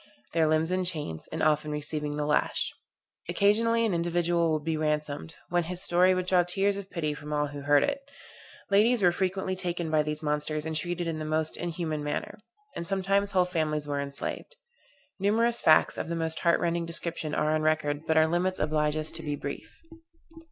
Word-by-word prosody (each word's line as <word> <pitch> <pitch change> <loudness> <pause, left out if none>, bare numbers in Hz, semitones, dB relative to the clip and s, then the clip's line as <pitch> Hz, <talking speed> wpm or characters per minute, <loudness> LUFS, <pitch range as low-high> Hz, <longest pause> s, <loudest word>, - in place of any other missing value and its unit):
Their 160 -1 +3
limbs 155 +2 +2
in 185 0 +1
chains, 150 - -3
and - - -2
often 150 0 +2
receiving 150 0 -3
the 150 0 -1
lash. 150 0 +1 0.6
Occasionally 225 +5 +3
an 215 - 0
individual 170 -1 +1
would 155 -1 -1
be 160 +1 -1
ransomed; 150 0 -2
when 175 -1 +1
his 180 +2 -3
story 180 +2 +4
would 185 0 -1
draw 180 -1 +4
tears 195 +3 0
of 200 -1 -7
pity 155 -4 -2
from 150 0 -9
all 150 -1 0
who 145 0 -7
heard 145 0 +4
it. 280 0 -3 0.6
Ladies 215 +2 +4
were 175 - +6
frequently 190 +1 -1
taken 175 -3 -3
by 155 -1 +4
these 150 +1 -3
monsters 150 +1 -1
and 160 0 -3
treated 175 +2 -2
in 165 -1 -3
the - - -3
most 155 0 -1
inhuman 165 -3 -3
manner. 150 +7 -4 0.4
And - - -3
sometimes 195 +2 +2
whole 185 -1 +4
families 155 -4 -1
were 145 -1 -1
enslaved. 140 - -5 0.6
Numerous 230 +4 +2
facts, 155 0 +4
of - - -4
the 170 - -1
most 160 -1 -2
heart 170 -1 +3
rending 170 -1 -1
description 165 -2 -3
are 155 +1 +1
on 155 - +1
record: 155 -1 0
but 160 - +2
our 155 - +6
limits 175 +3 0
oblige 150 0 +1
us 155 0 -3
to - - -5
be 150 -2 -3
brief. 140 - -8
165 Hz, 195 wpm, -28 LUFS, 150-180 Hz, 0.6 s, were